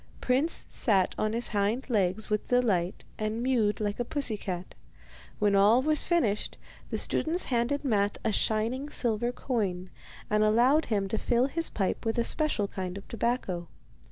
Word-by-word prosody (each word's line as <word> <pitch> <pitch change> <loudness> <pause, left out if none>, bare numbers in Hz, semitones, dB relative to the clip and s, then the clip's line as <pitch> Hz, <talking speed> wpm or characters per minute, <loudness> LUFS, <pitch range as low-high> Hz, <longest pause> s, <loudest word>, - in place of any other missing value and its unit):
Prince 270 +6 +1
sat 195 -7 +2
on 215 0 0
his 235 +1 0
hind 210 +4 -1
legs 210 -3 0
with 210 0 -1
delight 205 -8 +1
and 215 +2 -2
mewed 230 -5 +1
like 205 0 -2
a - - +1
pussy 260 -3 -1
cat. 185 -3 -6 0.6
When 205 -1 +2
all 210 +6 +5
was 305 +1 +3
finished, 235 - 0 0.3
the - - -2
students 335 +3 0
handed 245 +5 0
Matte 205 -5 +1
a 220 - +2
shining 225 +7 +1
silver 240 -3 0
coin, 195 -8 -3 0.4
and 210 0 +2
allowed 245 +8 +4
him 200 -4 -1
to 220 - -1
fill 240 +1 +2
his 330 +4 -2
pipe 195 -3 -2
with 225 +1 -1
a 235 - +2
special 300 -8 +2
kind 185 -1 -5
of 200 - -11
tobacco. 230 -7 -2
220 Hz, 165 wpm, -28 LUFS, 205-250 Hz, 0.6 s, all